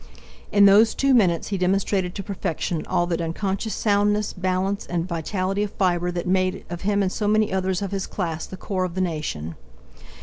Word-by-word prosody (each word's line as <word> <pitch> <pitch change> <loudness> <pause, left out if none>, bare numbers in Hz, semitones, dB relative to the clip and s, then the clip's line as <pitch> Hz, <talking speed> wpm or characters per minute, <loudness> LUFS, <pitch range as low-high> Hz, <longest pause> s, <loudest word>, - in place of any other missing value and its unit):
In 200 -1 +6
those 210 +3 +6
two 275 0 +3
minutes 185 -9 +3
he 195 -2 -2
demonstrated 185 0 0
to 195 - -4
perfection 175 -4 -3
all 175 - +1
that 170 -1 -2
unconscious 190 +6 -2
soundness, 205 0 +1
balance, 185 +1 -1
and 175 0 -2
vitality 185 +3 -2
of 210 -1 -2
fibre 180 -2 +1
that 175 -1 -3
made, 185 +1 0
of 175 - -5
him 200 0 +1
and 185 - 0
so 210 0 -2
many 215 -1 +2
others 190 0 0
of 200 - -4
his 195 -1 -2
class 165 -4 -3
the 185 - -8
core 185 0 -2
of 180 -1 -4
the 185 - 0
nation. 150 - -3
190 Hz, 195 wpm, -23 LUFS, 175-200 Hz, -, In